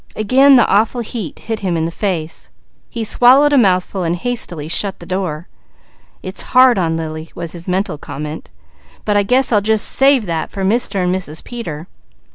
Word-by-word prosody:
Again 265 +6 +5
the 240 - +5
awful 220 +4 +1
heat 215 - -6
hit 225 -1 -5
him 180 -4 -1
in 160 - -1
the 165 - -3
face. 170 -4 -3 0.4
He 230 - -4
swallowed 260 +6 +5
a - - +5
mouthful, 185 -2 +1
hastily 175 -3 -3
shutting 195 +4 -1
the 170 - -12
door. 175 -3 -4 0.8
"It's 185 0 -3 0.2
hard 255 -4 +6
on 165 -2 0
Lily," 155 0 -6
was 170 -2 -4
his 175 +1 -9
mental 180 -4 -1
comment, 150 +1 -7 0.6
"but 210 - 0
I 205 - +4
guess 250 +6 +1
I'll 210 -3 +3
just 220 0 +2
save 270 -4 +3
that 165 -3 -3
for 195 - -5
Mr. 200 -2 0
and 180 0 +1
Mrs. 180 -5 -5
Peter. 170 -11 -7
190 Hz, 180 wpm, -17 LUFS, 165-230 Hz, 0.8 s, hard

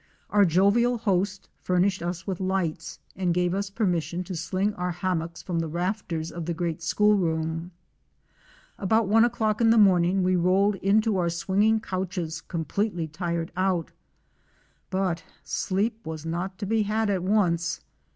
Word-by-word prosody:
Our 205 -1 +5
jovial 200 +8 +3
host 195 -3 -1
furnished 185 +2 +1
us 175 +1 -4
with 190 -3 -3
lights, 185 -4 -2 0.2
and 180 -2 0
gave 180 0 +1
us 200 +1 -2
permission 180 -4 -1
to 185 0 -6
sling 185 +5 -1
our 180 -2 -3
hammocks 170 -1 -3
from 175 -3 -2
the 165 - -1
rafters 170 -1 -3
of 170 -1 -6
the 170 - -1
great 170 0 -2
school 210 +5 +3
room. 165 -2 -1 1.1
About 220 +2 +2
one 225 +3 +5
o'clock 220 -2 +1
in 225 - +5
the 230 - +5
morning 185 -2 +4
we 185 0 +2
rolled 185 +4 +3
into 210 +2 +2
our 175 -2 +1
swinging 200 +6 +2
couches 185 -5 -4
completely 175 +1 -2
tired 170 +1 -3
out. 185 -2 0 1.0
But 185 -3 -1 0.2
sleep 215 +4 -1
was 160 -1 -6
not 175 +4 -3
to 200 - -4
be 220 +2 +1
had 215 0 0
at 190 -2 0
once. 175 -4 +1
185 Hz, 155 wpm, -26 LUFS, 170-200 Hz, 1.1 s, Our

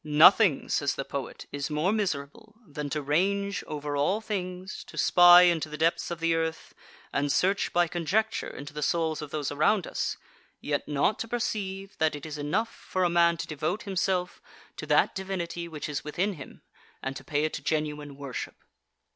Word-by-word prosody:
13. 150 -1 -3
Nothing, 180 0 +7
says 140 -1 +1
the 135 - -4
poet, 140 -3 -6
is 145 +1 -3
more 155 +5 +1
miserable 200 +1 -3
than 150 -3 -5
to 150 0 -2
range 200 +7 0
over 145 -1 -4
all 145 +9 +1
things, 185 -3 -5
to - - -13
spy 175 0 +8
into 165 -3 +2
the 150 - -6
depths 165 +2 +1
of 170 -1 -4
the 165 0 +2
earth, 160 0 -2 0.4
and 140 +1 +1
search, 195 +6 +1
by 175 0 +3
conjecture, 180 +7 0
into 145 +1 -9
the 150 - -5
souls 160 0 0
of 150 - -6
those 145 -1 -3
around 155 +7 +2
us, - - -2 0.4
yet 145 -1 -2
not 150 +8 +1
to 230 - -3
perceive 195 -4 -3
that 160 -1 +2
it 145 - -8
is 150 -1 -6
enough 200 +11 -1
for 185 - -2
a 175 - +3
man 170 0 +4
to - - -4
devote 155 +6 -3
himself 185 -1 -1 0.3
to - - -7
that - - +3
divinity 175 -3 -4
which 155 -3 -6
is 150 -1 -3
within 185 +7 -1
him, 145 -6 -11 0.4
and 135 0 -3
to - - -8
pay 150 -2 0
it 155 - -2
genuine 150 -2 -2
worship. 140 -3 -6
165 Hz, 190 wpm, -28 LUFS, 150-190 Hz, 0.4 s, spy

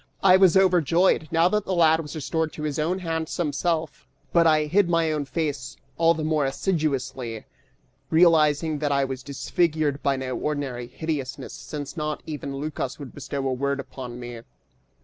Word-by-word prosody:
I 185 -1 +7
was 190 -1 +6
overjoyed, 180 -2 +3
now 165 +1 +4
that 210 0 +1
the 190 - -1
lad 160 -2 +5
was 150 -2 -6
restored 160 +1 -1
to 150 - -7
his 150 -1 -2
own 170 +5 0
handsome 165 -3 -2
self, 165 0 -2 0.3
but 170 -1 +5
I 155 -1 +4
hid 180 +4 +2
my 165 -2 +2
own 150 -2 -1
face 140 -1 -3 0.2
all 165 0 +4
the 160 - -3
more 155 -1 +1
assiduously, 135 - -2 0.6
realizing 160 -2 +4
that 145 -1 0
I 140 -1 +2
was 130 -1 -5
disfigured 150 +1 0
by 140 -1 +1
no 130 -1 -3
ordinary 140 -5 -3
hideousness 140 -3 -4
since 145 0 -7
not 150 -2 -3
even 140 -3 -5
Lycas 145 -3 -4
would 140 -4 -9
bestow 140 0 -4
a 130 - 0
word 140 +2 -1
upon 125 -3 -7
me. 120 -1 -7
150 Hz, 170 wpm, -25 LUFS, 140-165 Hz, 0.6 s, I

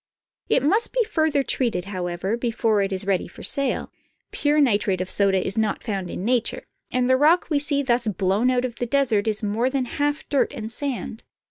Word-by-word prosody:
It - - +2
must 405 +11 +3
be - - +2
further 315 -9 0
treated, 230 -10 -1
however, 185 +1 -3
before 230 -3 0
it 195 0 -1
is 190 0 -3
ready 195 -3 0
for - - -13
sale. 275 -2 -1 0.4
Pure 295 +1 +1
nitrate 205 -7 +1
of 185 0 -3
soda 195 -2 +2
is 195 +4 +1
not 220 -1 -1
found 195 -5 -3
in 185 - -5
nature, 240 -1 0 0.3
and 250 -1 +1
the 260 0 +4
rock 325 +5 +3
we 290 - +3
see 285 -1 +3
thus 240 -2 +1
blown 200 +4 +1
out 250 0 +1
of 235 -2 -6
the 245 - -3
desert 230 -6 +3
is 215 0 -1
more 220 +5 0
than 265 -1 -1
half 290 +4 -2
dirt 280 - 0
and 220 -1 -6
sand. 245 -3 -5
235 Hz, 205 wpm, -23 LUFS, 200-280 Hz, 0.4 s, the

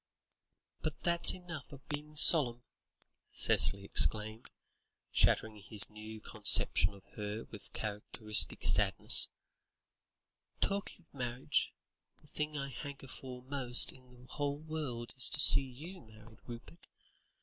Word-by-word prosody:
"But 155 -2 -6
that's 170 +1 +2
enough 175 -6 -11
of 140 -1 -15
being 150 +1 -8
solemn," 125 -6 +2 0.7
Cicely 100 0 +2
exclaimed, 110 +3 +2 0.6
shattering 110 -1 0
his 105 +1 -7
new 110 +1 -11
conception 100 -3 +1
of 100 - -18
her 105 +1 -7
with 105 - -12
characteristic 105 0 0
suddenness; - - +5 1.3
"talking 195 -3 -4
of - - -44
marriage, 125 +1 -3 0.5
the - - -26
thing 150 +1 -6
I 140 0 -6
hanker 140 0 -10
for 125 -1 -10
most 130 -2 +3
in 130 -1 -20
the 125 0 -19
whole 145 +2 -5
world 150 -7 -7
is 130 -2 +2
to - - -4
see - - +8
you 150 +8 -12
married, 110 -1 -19
Rupert. 120 +8 -13
125 Hz, 125 wpm, -31 LUFS, 110-150 Hz, 1.3 s, see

